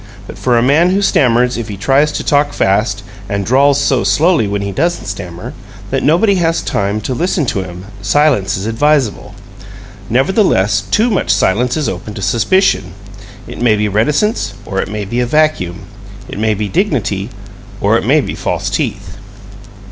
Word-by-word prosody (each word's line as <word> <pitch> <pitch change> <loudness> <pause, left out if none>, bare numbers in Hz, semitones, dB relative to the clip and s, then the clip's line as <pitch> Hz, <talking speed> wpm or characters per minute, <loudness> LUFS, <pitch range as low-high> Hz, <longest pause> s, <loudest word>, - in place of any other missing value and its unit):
But - - -10
for 125 -2 +2
a 115 - +3
man 150 +7 +3
who 195 +2 +1
stammers 125 -7 +2
if 115 -2 -4
he 105 -3 -6
tries 135 +8 +2
to - - -3
talk 145 0 +1
fast, 100 +3 0 0.3
and 100 -1 -2
drawls 140 +4 +3
so 135 -5 +1
slowly, 145 - +2
when 100 0 -2
he 100 - -3
doesn't 170 - -1
stammer, 90 -4 -7 0.4
that - - 0
nobody 175 +9 +3
has 165 0 0
time 100 +2 -1
to 130 - -3
listen 170 +2 0
to 100 - -1
him, 90 0 -9 0.2
silence 105 -3 +2
is 95 - -5
advisable. 130 +1 0 0.7
Nevertheless, 120 - +2
too 230 +3 +2
much 200 - -1
silence 120 +8 +1
is 150 - -1
open 95 +3 -5
to - - -6
suspicion. 155 - +1 0.5
It - - -9
may 115 -3 +3
be 105 0 0
reticence, 145 - 0
or 95 0 -2
it - - -5
may 105 -1 -4
be 120 +5 -3
a 125 - 0
vacuum. 150 - 0 0.5
It - - -7
may 110 0 +1
be 105 +1 -3
dignity, 115 - -1 0.5
or - - +2
it - - +1
may - - +3
be - - -5
false - - -3
teeth. 100 -1 -3
120 Hz, 180 wpm, -14 LUFS, 100-150 Hz, 0.7 s, a